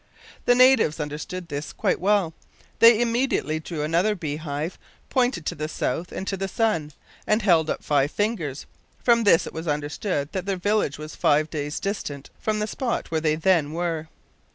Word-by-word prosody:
The 245 - +5
natives 255 - +5
understood 155 +4 -5
this 145 0 -5
quite - - 0
well. 195 -3 +2 0.5
They 230 -1 +8
immediately 235 -9 0
drew 155 -1 -5
another 170 +7 +2
bee 150 -5 -4
hive, 155 +2 -4 0.3
pointed 245 - +1
to - - -1
the 155 +1 -4
south 160 +2 -3
and 195 - -5
to 195 - -1
the 195 0 -3
sun, 190 -8 0 0.3
and 215 0 +2
held 165 -5 +4
up - - -2
five 145 -1 +2
fingers. 170 - -2 0.4
From 235 -2 +4
this 170 -5 +5
it - - -8
was 160 +1 -6
understood 145 +1 -2
that 190 0 -4
their 195 -1 0
village 205 -6 0
was 155 0 -8
five 150 +2 +2
days 150 -1 -3
distant 150 -9 -4
from 215 -1 -1
the 210 - 0
spot 235 - -3
where 160 -1 0
they 155 -1 +2
then 160 -3 +2
were. 165 -2 -2
170 Hz, 180 wpm, -24 LUFS, 150-210 Hz, 0.5 s, They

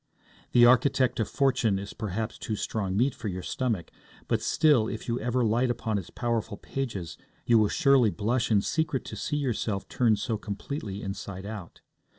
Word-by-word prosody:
The 120 0 +7
Architect 130 +1 +4
of 110 - 0
Fortune 130 -7 +2
is 100 +1 -6
perhaps 110 +1 -4
too 110 - -3
strong 100 -2 -2
meat 130 +4 +3
for - - -6
your 90 -2 -4
stomach; 115 -10 -2 0.4
but - - +1
still, 145 -9 +3
if - - -6
you 120 0 -1
ever 125 0 0
light 120 +4 +2
upon 110 -3 -1
its 95 - -9
powerful 115 -3 -2
pages, 110 -11 -5 0.3
you 115 -2 +5
will 105 -1 +3
surely 135 -5 +4
blush 115 +4 0
in 105 -3 +4
secret 160 -5 -1
to - - -6
see 150 - -2
yourself 115 -7 -2
turned 115 -4 +2
so 115 -3 -2
completely 105 0 -5
inside 95 -1 -6
out. 105 -5 -8
115 Hz, 175 wpm, -28 LUFS, 100-125 Hz, 0.4 s, The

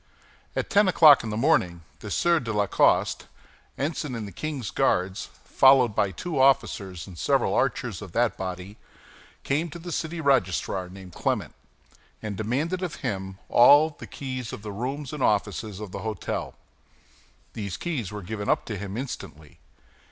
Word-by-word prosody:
At - - -2
ten 205 0 +5
o'clock 155 -7 +7
in 110 - -4
the 105 - -3
morning 90 - +2 0.2
the 105 - -8
Sieur 170 - +2
de 115 -6 -4
la 105 -1 +1
Coste, - - +2 0.5
ensign 145 -2 -2
in 110 -2 -4
the 100 - -8
king's 130 - -4
Guards, 95 0 0
followed 130 -4 +5
by 100 - +2
two 145 - -4
officers 100 -9 +2
and 90 -4 -11
several - - +2
archers - - -1
of - - -9
that - - +2
body, 95 +2 -6 0.7
came 155 +5 0
to 155 - -8
the 175 +1 -8
city 165 +1 -3
registrar, 95 - +1
named 95 -1 -12
Clement, - - -2 0.7
and 105 -2 -5
demanded 140 - -1
of 180 -4 -3
him 95 -1 -3
all 145 +6 +7
the - - -11
keys 130 -4 -5
of 105 - -8
the 105 - -5
rooms 135 +6 -4
and 150 - -5
offices 105 -2 0
of 105 -3 -7
the - - -5
hôtel. 110 -4 -4 1.0
These 100 -4 -5
keys 135 - -3
were 105 -1 -6
given 105 +2 -4
up - - +2
to 110 -4 -5
him 100 +1 -5
instantly. 80 - -7
110 Hz, 165 wpm, -26 LUFS, 95-145 Hz, 1.0 s, o'clock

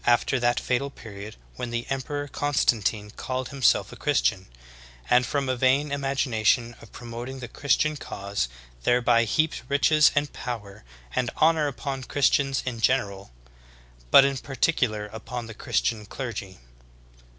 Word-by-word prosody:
after 120 +2 +3
that 120 0 +2
fatal 130 +3 -1
period 105 -5 -10 0.2
when 125 - -4
the 120 0 -3
Emperor 145 +2 -3
Constantine 115 -8 0
called 130 +2 -4
himself 135 -3 +2
a - - -9
Christian, 80 +11 +1 0.6
and 125 0 +5
from 140 -2 -1
a 130 - +1
vain 135 +4 +2
imagination 125 -4 +1
of 115 - -14
pro 120 - -11
moting 120 +3 -6
the 125 - -6
Christian 145 +5 +1
cause 100 - -3 0.3
thereby 120 - +3
heaped 155 +8 0
riches 150 +2 +5
and 145 0 0
power 105 -5 -6 0.3
and 125 -2 +1
honor 160 -1 +4
upon 135 -1 -4
Christians 135 0 +1
in 125 -3 -3
general, 100 -6 +1 0.8
but 135 - +8
in 140 -1 0
particular 125 -6 0
upon 115 +2 -6
the 115 - -8
Christian 105 0 -1
clergy. 105 -7 -6
125 Hz, 140 wpm, -26 LUFS, 110-140 Hz, 0.8 s, but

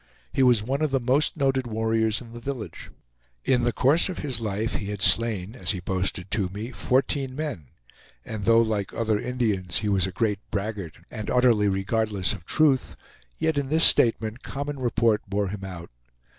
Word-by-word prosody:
He - - +1
was 120 -5 +4
one 135 +6 -2
of 155 - +2
the 135 0 +1
most 130 +7 +2
noted 135 -3 +1
warriors 110 0 0
in 115 -2 -12
the 120 - -8
village. 125 -2 -6 0.6
In 125 -2 +3
the 120 - +2
course 145 - +3
of 185 - -5
his 130 -5 -3
life 110 +1 -2
he 100 - -5
had 105 -1 -4
slain 110 -4 +2
as 90 -7 -4
he 95 - 0
boasted 95 +1 -2
to 100 -4 +1
me, 105 +6 -6
fourteen 130 +1 0
men, 140 - -5 0.6
and 110 -2 -5
though, 115 +1 +5
like 105 -4 -3
other 110 -2 0
Indians, 105 -8 -1
he - - +1
was 95 -2 +2
a - - -5
great 105 +1 -1
braggart 100 -5 -4
and 110 -3 -5
utterly 120 -5 +3
regardless 100 0 0
of 90 -6 -10
truth, 145 - +2 0.4
yet 160 -3 0
in 135 -2 -4
this 160 +2 +4
statement 115 0 +4
common 140 0 -5
report 115 -3 +1
bore 100 0 -1
him 100 0 -6
out. 90 -5 -8
110 Hz, 185 wpm, -25 LUFS, 100-130 Hz, 0.6 s, though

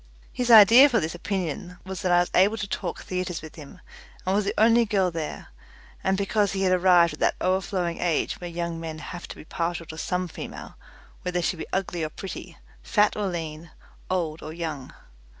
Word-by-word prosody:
His 245 -1 -2
idea 230 +5 +9
for 235 -4 +2
this 160 -2 -3
opinion 180 -1 -4
was 190 -2 -6
that 180 - 0
I 175 0 +5
was 175 - -3
able 200 +4 +4
to 205 - -3
talk 180 -3 -4
theatres 180 -3 -4
with 155 - -10
him, 155 +4 -12 0.5
and 185 - +1
was 205 0 +1
the - - -1
only 230 +2 +5
girl 195 -4 +1
there, 165 -2 -5 0.5
and 190 0 +1
because 200 0 +1
he 195 0 -1
had 185 - +3
arrived 175 -2 +5
at 150 - -10
that - - +2
overflowing 185 -2 -1
age 170 0 -1
when 175 -1 -6
young 170 -1 -3
men 160 -1 -6
have 175 +2 -8
to - - -9
be - - -12
partial 170 +1 -3
to 160 0 -9
some 180 0 -1
female 165 - -8 0.5
whether 180 0 -2
she 180 - 0
be 160 - -7
ugly 180 -3 -2
or 155 - -2
pretty, 190 +4 -8 0.2
fat 210 -1 +2
or 210 -2 -1
lean, 165 -2 -5 0.4
old 165 -4 -1
or 155 - -7
young. 160 -5 -5
180 Hz, 205 wpm, -25 LUFS, 165-195 Hz, 0.5 s, idea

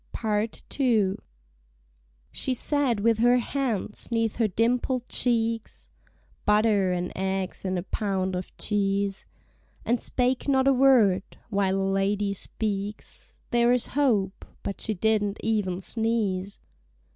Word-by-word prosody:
PART 215 0 -2 0.2
II. 220 -8 +2 1.1
She 255 - -1
sat 265 -5 +1
with 225 0 +2
her 245 +2 +5
hands 240 -4 -2
'neath 225 -2 0
her 225 -2 +2
dimpled 240 +4 0
cheeks, 230 -2 -1 0.5
(Butter 210 -3 +3
and 180 0 -2
eggs 190 0 -2
and 185 -1 -1
a 175 - -3
pound 190 -2 -2
of 180 0 -6
cheese) 200 -1 -1 0.6
And 240 0 +1
spake 250 +1 0
not 265 -1 +3
a 275 - +6
word. 245 -8 +5 0.3
While 195 -2 +1
a - - 0
lady 200 +1 0
speaks 205 +1 -5
There 240 0 +4
is 250 - +1
hope, 220 -9 +1 0.2
but 200 - -5
she 215 - +1
didn't 210 +1 +1
even 200 -5 0
sneeze. 205 -3 -1
215 Hz, 125 wpm, -26 LUFS, 195-235 Hz, 1.1 s, a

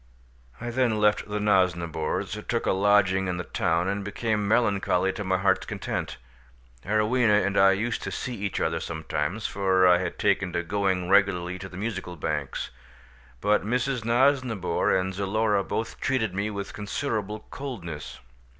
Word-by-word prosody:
I 120 +1 -4
then 120 -3 +1
left 105 0 +2
the 105 0 -2
Nosnibors, 85 -6 0
took - - -1
a - - +2
lodging 95 -1 +3
in 90 -1 -2
the 90 - -3
town, 85 +1 0
and 100 +1 -2
became 105 0 -1
melancholy 100 -4 +2
to 105 - -5
my 95 -1 +1
heart's 95 0 +1
content. - - -4 0.7
Arowhena 105 +1 +3
and 100 - -1
I 95 0 +6
used 110 +4 -2
to - - -4
see 125 - -4
each 100 -3 -3
other 80 0 0
sometimes, 80 +5 -3
for 95 -2 +3
I 90 -1 +6
had 90 - -3
taken 100 -3 +1
to 85 - -1
going 95 -1 0
regularly 90 -2 +2
to 95 0 -7
the 90 - -10
Musical 95 -4 -4
Banks, 80 - -3 0.7
but 105 +1 +2
Mrs. 125 +3 -1
Nosnibor 120 -4 +2
and 95 0 +1
Zulora 100 +1 +1
both 115 +4 -4
treated 120 -7 0
me 100 +2 -1
with 100 -1 -5
considerable 105 -1 -3
coldness. 90 - -6
100 Hz, 160 wpm, -26 LUFS, 95-110 Hz, 0.7 s, I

